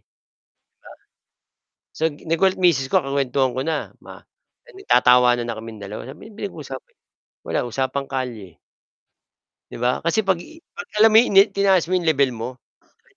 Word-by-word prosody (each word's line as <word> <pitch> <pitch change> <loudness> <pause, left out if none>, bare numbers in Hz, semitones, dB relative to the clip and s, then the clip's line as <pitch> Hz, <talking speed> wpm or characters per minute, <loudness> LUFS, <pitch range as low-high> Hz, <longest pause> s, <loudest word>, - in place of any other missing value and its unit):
'di - - -50
ba. - - -84 1.8
So, - - -9
gi 145 -2 -14
nagulat 185 +4 +1
misis 165 -8 +2
ko, 190 - +1
kukuwentuhan 135 -2 0
ko 130 - -3
na, 155 +1 -3
ma - - -13 0.4
eh, - - -18
nagtatawanan 125 - +3
na 115 -1 -5
kaming 110 0 -9
dalawa, 105 +5 -8
sabi, 135 - -11
"Ano - - -18
pinag-usapan 150 -11 -8 0.5
wala 120 - -2
usapang 135 +2 -3
kalye." 115 -10 -5 1.1
'Di - - -8
ba, 125 +1 0
kasi 170 +6 +2
'pag 190 -3 +1
ii 320 - -14 0.2
'pag, 470 - -7
alam 220 +1 +7
mo - - +5
'yon, 245 - 0
inen 195 +2 +6
tinaas 195 -3 +3
mo 185 - +1
yung 175 - -2
level 140 -3 +3
mo, 115 - -4 0.5
parang, - - -33
140 Hz, 175 wpm, -21 LUFS, 125-185 Hz, 1.8 s, alam